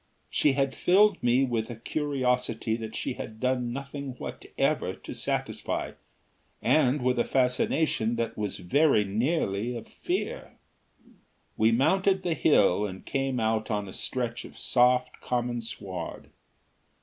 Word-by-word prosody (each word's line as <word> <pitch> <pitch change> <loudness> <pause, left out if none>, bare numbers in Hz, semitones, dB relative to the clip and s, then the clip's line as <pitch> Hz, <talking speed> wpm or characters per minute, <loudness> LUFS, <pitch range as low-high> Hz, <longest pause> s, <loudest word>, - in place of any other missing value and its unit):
She 145 - +3
had 135 -1 +1
filled 200 +1 +4
me 125 +2 +3
with 115 -3 -1
a 120 - -5
curiosity 125 -4 -1
that 110 -1 -6
she - - -2
had 110 -2 -8
done 125 -1 0
nothing 140 +1 -5
whatever 125 - -2
to - - -9
satisfy, - - -2 0.7
and 140 -3 +3
with 125 -1 +2
a - - +4
fascination 125 -2 +1
that 115 0 -2
was 105 -1 -3
very 135 - +3
nearly 115 - 0
a 115 - -7
fear. - - -4 1.0
We 110 +1 +4
mounted 190 +10 +3
the 175 - +1
hill 105 - +4
and 95 -1 -9
came 135 -2 -1
out 110 -1 0
on 105 -2 -1
a 95 - -9
stretch 120 -2 -3
of - - -12
soft 125 0 +2
common 120 -1 -1
sward. 95 -6 -7
125 Hz, 135 wpm, -28 LUFS, 110-135 Hz, 1.0 s, filled